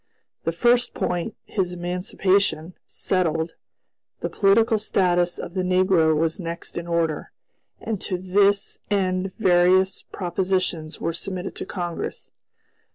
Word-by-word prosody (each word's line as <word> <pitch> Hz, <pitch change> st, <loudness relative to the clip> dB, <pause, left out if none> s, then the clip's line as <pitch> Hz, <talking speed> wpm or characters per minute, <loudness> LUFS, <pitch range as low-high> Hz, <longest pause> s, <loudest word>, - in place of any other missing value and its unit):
The 165 Hz, -, +1 dB
first 240 Hz, +8 st, +2 dB
point, 175 Hz, +4 st, -2 dB
his 185 Hz, -3 st, -1 dB
emancipation, 180 Hz, 0 st, 0 dB
settled, 165 Hz, -3 st, 0 dB, 0.7 s
the -, -, -2 dB
political 220 Hz, +2 st, +3 dB
status 175 Hz, -4 st, +1 dB
of 170 Hz, -, -6 dB
the 190 Hz, -, 0 dB
negro 180 Hz, -4 st, +3 dB
was 165 Hz, +4 st, 0 dB
next 170 Hz, -1 st, -6 dB
in 170 Hz, 0 st, -4 dB
order; 165 Hz, -3 st, -1 dB, 0.5 s
and 220 Hz, -4 st, -4 dB
to 185 Hz, -, -2 dB
this 195 Hz, +2 st, +2 dB
end 185 Hz, -1 st, 0 dB
various 185 Hz, -1 st, +4 dB
propositions 180 Hz, -3 st, -2 dB
were 165 Hz, -, -1 dB
submitted 185 Hz, +2 st, -5 dB
to -, -, -5 dB
Congress. 175 Hz, -3 st, -5 dB
180 Hz, 120 wpm, -24 LUFS, 170-195 Hz, 0.7 s, various